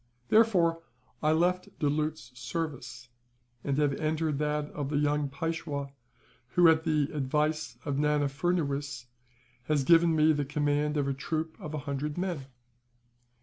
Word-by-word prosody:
Therefore 180 -7 +4 0.4
I 155 - +3
left 180 +3 0
Doulut's 150 -1 -1
service, 135 -4 -5 0.5
and 140 -1 -1
have 145 -2 +2
entered 155 -2 0
that 150 0 -1
of 145 -2 -4
the 145 - 0
young 145 0 +1
Peishwa 145 -1 -3 0.6
who, 175 -1 +7
at 160 +1 +3
the 150 -3 +1
advice 150 -1 -1
of 140 -1 -1
Nana 150 0 +2
Furnuwees, 140 -3 -2 0.6
has 150 -1 +1
given 165 +2 +5
me 155 0 +5
the 145 -1 0
command 145 +1 0
of 140 -1 +1
a 140 - 0
troop 160 +4 -3
of 155 0 -6
a 145 - -6
hundred 145 +2 -3
men. 175 -7 -3
150 Hz, 145 wpm, -29 LUFS, 140-160 Hz, 0.6 s, who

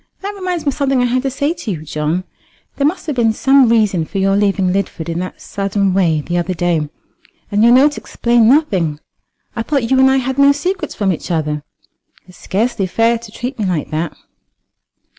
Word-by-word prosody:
"That 400 +1 -4
reminds 365 -4 -4
me - - +3
of - - -2
something 275 -2 0
I - - +2
had 250 +1 +1
to 270 - -1
say 285 +4 -1
to 250 - -7
you, 165 -6 -4
John. 155 +4 -2 0.5
There 280 - +2
must 360 +4 -3
have 300 -4 -3
been 230 -3 +2
some 270 +1 +4
reason 210 -7 +2
for 195 - -6
your 195 0 +2
leaving 195 -2 +1
Lidford 185 -4 -3
in 165 +1 -2
that 185 +1 -6
sudden 195 -1 -1
way 170 -5 +2
the 175 +4 -2
other 180 +1 -2
day, 165 -3 0 0.6
and 205 +1 +2
your 235 - +6
note 280 +4 +4
explained 235 -1 +2
nothing. 190 - +2 0.6
I 230 - -2
thought 250 -1 -1
you 265 - +4
and 265 0 +6
I 265 - +3
had 265 +1 -2
no 280 0 +6
secrets 360 +7 -3
from 195 -3 +1
each 160 - -7
other, 150 -3 -1 0.6
It's 180 0 -17
scarcely 205 -1 -1
fair 230 +5 +1
to 230 -2 -12
treat 245 +3 -6
me 210 - 0
like 175 -5 -2
that." 155 0 -3
220 Hz, 210 wpm, -17 LUFS, 180-265 Hz, 0.6 s, your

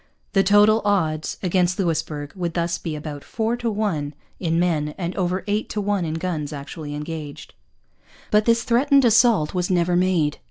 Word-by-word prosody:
The 195 - +5
total 205 +3 +5
odds 160 -7 0
against 180 0 +1
Louisbourg 155 -5 -2
would 175 -3 -3
thus 170 0 -1
be 160 -2 -4
about 150 -1 -7
four 225 +1 -1
to 240 -1 -2
one 175 -10 -2 0.2
in 165 -2 0
men 155 -4 0
and 175 -1 -4
over 185 -1 -1
eight 210 +1 -1
to 210 - -3
one 200 -3 0
in 160 0 -3
guns 165 -4 -3
actually 145 +1 -7
engaged. 150 -1 -7 0.8
But 210 -1 +4
this 230 0 +3
threatened 275 +3 +3
assault 225 -8 +4
was 180 -1 -1
never 175 -1 +2
made. 175 -5 +1
180 Hz, 170 wpm, -22 LUFS, 155-205 Hz, 0.8 s, The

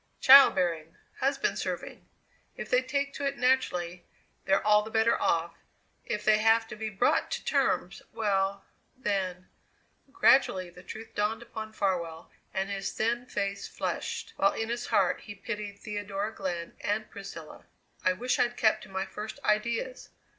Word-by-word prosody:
Child 275 +1 +9
bearing; 165 -3 -1 0.2
husband 275 +1 0
serving. - - -5 0.5
If - - -7
they 250 - +5
take 280 +2 -2
to 280 - -4
it 275 - -3
naturally 180 -9 +1 0.4
they're 195 +1 +2
all 210 0 +6
the 215 - -7
better 225 +1 +2
off; 165 0 +1 0.5
if 210 -1 -3
they 215 0 +5
have 225 +1 +4
to - - -6
be 220 0 -4
brought 200 -2 +1
to - - -3
terms - - 0
well, 195 -2 0 0.3
then 190 -6 -2 0.4
" 270 - -35
Gradually 190 -11 +3
the 180 - -13
truth 220 +4 -9
dawned 215 +3 -1
upon 220 -2 -7
Farwell, 170 -6 -2 0.2
and 195 +1 -2
his 195 -1 -3
thin 235 +3 -1
face 200 -3 -3
flushed, - - -4
while 195 - +3
in 225 0 -3
his 240 +1 -3
heart 190 -3 +2
he 205 - -9
pitied 205 -1 -5
Theodora 205 0 -4
Glenn 175 -4 -4
and 215 +1 -1
Priscilla. 195 -6 -9 0.4
"I 185 - +3
wish 245 +7 -1
I'd 240 0 +1
kept 215 -1 +3
to - - -16
my 190 0 -2
first 215 +4 -7
ideas!" 235 +4 -1
210 Hz, 160 wpm, -29 LUFS, 195-230 Hz, 0.5 s, Child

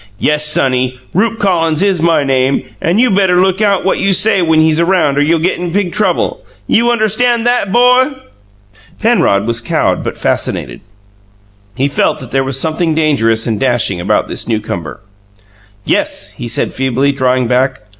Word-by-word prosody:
"Yes, 150 +5 0
sonny, 130 -3 0
Rupe 225 +5 0
Collins 170 -4 0
is 195 -4 +1
my 165 -3 +2
name, 135 0 0 0.2
and 175 +6 +1
you 250 -1 +3
better 190 -2 +2
look 190 +2 +1
out 200 -3 +1
what 195 - 0
you 195 0 +1
say 200 +1 +3
when 160 -2 +2
he's 160 0 +2
around 170 -5 +1
or 145 - +1
you'll 160 +3 +2
get 170 +3 -1
in 175 -1 -4
big 190 -1 -1
trouble! 190 -5 -1 0.2
YOU 235 - +2
UNDERSTAND 235 +1 +1
THAT, 245 -5 0
'BO?" 250 +4 +3 0.8
Penrod 215 - +2
was 115 0 -1
cowed 115 - -1
but - - -5
fascinated: - - -3 0.9
he 135 +3 0
felt 140 - 0
that 130 -5 -11
there 135 0 +1
was 135 0 -1
something 160 +1 -1
dangerous 115 -8 +1
and 110 -3 -2
dashing 120 -8 0
about 105 +4 0
this - - -5
newcomer. 105 -7 -4 0.8
"Yes," 100 +1 -2
he 120 +3 -8
said, 115 - -2
feebly, 135 +1 0
drawing 130 -2 0
back. 130 +1 0
155 Hz, 170 wpm, -13 LUFS, 130-195 Hz, 0.9 s, you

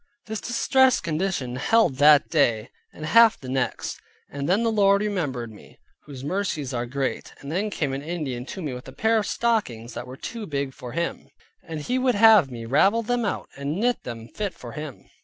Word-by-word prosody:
This 220 -1 -5
distressed 260 +1 +3
condition 155 -6 -2
held 175 - +2
that 145 +1 +6
day, 120 -9 +1 0.2
and 155 - -8
half 230 +7 +6
the 130 - -10
next. 130 -1 -2 0.3
And 140 +1 -4
then 200 +5 +3
the 230 - +2
Lord 200 -1 +4
remembered 145 - -2
me, 105 - -16 0.3
whose 135 -3 -9
mercies 150 -5 -2
are 120 0 -2
great. 135 +2 -3
Then 180 +9 -2
came 145 -8 -2
an 135 - -3
Indian 145 -6 -4
to 190 - -6
me 145 -4 -3
with 125 0 -9
a 130 - -10
pair 220 +5 +2
of 210 - -3
stockings 125 - -1
that - - -6
were 130 +1 -9
too 225 - -6
big 140 -2 -3
for 125 -2 -9
him, 170 +1 -3 0.3
and 160 -2 -6
he 250 +11 -1
would 255 -1 +2
have 210 -8 +7
me 115 -2 -7
ravel 195 - +3
them 240 +1 0
out, 205 - -3
and 140 +5 -3
knit 245 +2 +1
them 115 -2 -7
fit 205 - -4
for 120 - -9
him. 150 -1 -8
155 Hz, 200 wpm, -24 LUFS, 130-210 Hz, 0.3 s, have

